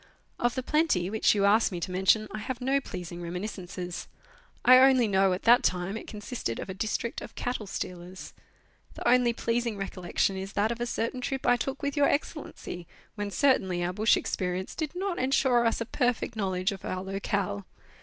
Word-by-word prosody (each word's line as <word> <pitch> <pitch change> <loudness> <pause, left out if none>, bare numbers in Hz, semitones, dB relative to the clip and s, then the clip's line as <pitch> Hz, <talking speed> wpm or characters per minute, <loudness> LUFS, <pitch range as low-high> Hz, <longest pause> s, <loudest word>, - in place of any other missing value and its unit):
Of 240 0 +1
the 260 - -2
Plenty, 275 - +1
which 220 0 +3
you 200 -1 +2
ask 215 +2 +4
me 175 - -4
to 180 - -3
mention, 190 +4 +3
I 215 - -5
have 240 +3 -4
no 270 +2 +1
pleas 180 -7 -7
ing 175 0 -7
reminiscences. 180 0 -5 0.6
I 255 +1 +9
only 260 -3 +6
know 195 -1 +3
at 180 - -2
that 240 +1 +6
time 180 +2 0
it 225 - -7
consisted 210 - -4
of 190 - -5
a - - -4
district 220 +4 -2
of - - -10
cattle 245 -4 -3
stealers. 180 0 -6 0.6
The - - -3
only 245 -1 +5
pleasing 230 -1 -1
recollection 190 0 -1
is 195 +1 -6
that 210 +3 +1
of 235 0 -4
a 240 - 0
certain 235 +2 -2
trip 265 +1 -3
I 245 - +5
took 270 +4 -4
with 285 0 -1
Your 290 -1 +4
Excellency, 280 - -4 0.3
when 205 -1 -4
certainly 190 -8 +2
our 175 +1 -1
bush 215 +3 +4
experience 185 0 -2
did 310 +1 -4
not 375 -1 -2
ensure 255 -2 +3
us 230 - 0
a - - -1
perfect 245 -1 -1
knowledge 190 -1 0
of 195 - -8
our 185 0 -3
locale. 195 - -2
215 Hz, 195 wpm, -28 LUFS, 185-245 Hz, 0.6 s, I